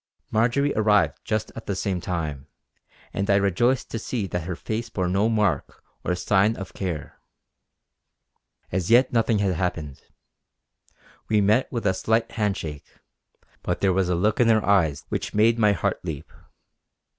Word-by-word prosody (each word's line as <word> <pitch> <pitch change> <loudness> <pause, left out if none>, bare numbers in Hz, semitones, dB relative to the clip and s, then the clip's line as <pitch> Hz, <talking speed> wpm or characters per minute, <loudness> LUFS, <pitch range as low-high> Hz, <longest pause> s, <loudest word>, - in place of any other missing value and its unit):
Marjory 120 +6 +2
arrived 105 -8 +2
just 110 0 -2
at 115 - -9
the 100 - -1
same 95 -1 -2
time, 75 -6 -4 0.7
and 100 0 -2
I 100 - +5
rejoiced 100 +6 +1
to 115 - -3
see 110 -1 -3
that 90 -3 -4
her 90 0 -3
face 115 +6 -4
bore 95 -5 -2
no 100 +5 +2
mark 105 -10 -1 0.2
or 90 - 0
sign 100 +4 +2
of 95 -2 -8
care. 85 -7 -5 1.5
As 90 +1 -1
yet 125 +3 +5
nothing 115 -1 +2
had 100 -2 +1
happened. 80 -5 -3 1.3
We 110 - +3
met 105 +5 +2
with 120 -4 -3
a 95 - +3
slight 110 +4 0
hand 105 -3 -1
shake; 75 -3 -7 0.7
but - - -2
there 95 -2 +3
was 95 -1 +1
a 90 - +2
look 105 +5 +1
in 120 - +5
her 110 -2 +3
eyes 80 -8 +2
which - - -3
made 115 +2 +4
my 105 -2 +4
heart 85 - -2
leap. 80 -4 -6
100 Hz, 165 wpm, -24 LUFS, 90-110 Hz, 1.5 s, I